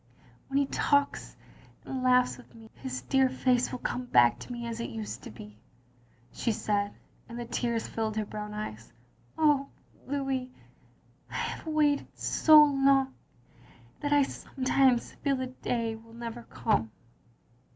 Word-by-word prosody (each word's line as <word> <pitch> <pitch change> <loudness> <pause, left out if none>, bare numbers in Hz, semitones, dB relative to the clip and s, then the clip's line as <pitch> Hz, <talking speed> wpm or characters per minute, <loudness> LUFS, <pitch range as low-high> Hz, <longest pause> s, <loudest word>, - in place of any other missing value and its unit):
"When 275 - -1
he 280 - +3
talks 285 +1 0 0.5
and 265 -1 -4
laughs 250 0 +4
with 250 - -17
me 225 -1 -14
— - - -20
^his 130 -1 -5
dear 265 -1 +4
face 255 -1 +1
will - - -3
come 250 0 -3
back 120 - +5
to - - -9
me 240 -1 -5
as 230 0 -4
it 235 - -3
used 220 -2 -6
to - - -9
be, 105 -1 -12 0.4
" 120 0 -33
she 230 - 0
said, 205 -1 -1 0.3
and 235 - -7
the 240 - -4
tears 235 -1 -1
filled 220 -1 -3
her 215 - 0
brown 210 0 -6
eyes. 115 - -6 0.5
"Oh, 295 -3 +3 0.4
Louis 270 -2 -2 0.4
— - - -35
I - - -9
have - - -4
waited 300 -2 +2
so 310 -1 +7
long 275 -2 +3 0.9
that 290 -1 -2
I 290 -1 +5
sometimes 260 -2 +1
feel 280 -1 0
the 260 0 -2
day 235 -3 -2
will 225 +1 -15
never 235 0 -6
come." 205 - 0
245 Hz, 160 wpm, -29 LUFS, 220-270 Hz, 0.9 s, so